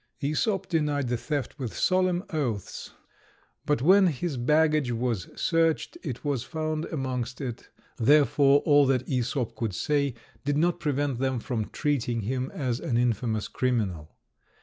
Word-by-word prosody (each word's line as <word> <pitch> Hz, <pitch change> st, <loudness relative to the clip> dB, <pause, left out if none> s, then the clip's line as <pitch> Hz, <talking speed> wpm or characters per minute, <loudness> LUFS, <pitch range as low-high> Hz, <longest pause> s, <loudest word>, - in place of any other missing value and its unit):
Æsop 190 Hz, -, 0 dB
denied 150 Hz, -5 st, 0 dB
the 120 Hz, -, +1 dB
theft 145 Hz, +3 st, -4 dB
with 125 Hz, -5 st, -5 dB
solemn 185 Hz, -1 st, +2 dB
oaths, 125 Hz, -, -3 dB, 0.8 s
but 145 Hz, -4 st, +1 dB
when 190 Hz, +4 st, +6 dB
his 160 Hz, 0 st, -2 dB
baggage 150 Hz, +1 st, +2 dB
was 115 Hz, -5 st, -2 dB
searched 165 Hz, -2 st, +1 dB
it 130 Hz, -1 st, -6 dB
was 140 Hz, -4 st, 0 dB
found 155 Hz, +1 st, -3 dB
amongst 125 Hz, -4 st, -3 dB
it; 125 Hz, -4 st, -6 dB, 0.3 s
therefore, 140 Hz, +2 st, +5 dB
all 145 Hz, -2 st, +5 dB
that 130 Hz, -1 st, +1 dB
Æsop 125 Hz, -2 st, -1 dB
could 110 Hz, -4 st, -3 dB
say 140 Hz, +2 st, 0 dB, 0.3 s
did 145 Hz, 0 st, 0 dB
not 175 Hz, +3 st, +1 dB
prevent 145 Hz, -4 st, -1 dB
them 130 Hz, -2 st, 0 dB
from 115 Hz, -3 st, -3 dB
treating 125 Hz, -5 st, -1 dB
him 130 Hz, +5 st, -2 dB
as 125 Hz, -4 st, -2 dB
an 120 Hz, -, -1 dB
infamous 115 Hz, -2 st, 0 dB
criminal. 105 Hz, -12 st, -2 dB
135 Hz, 145 wpm, -27 LUFS, 120-150 Hz, 0.8 s, when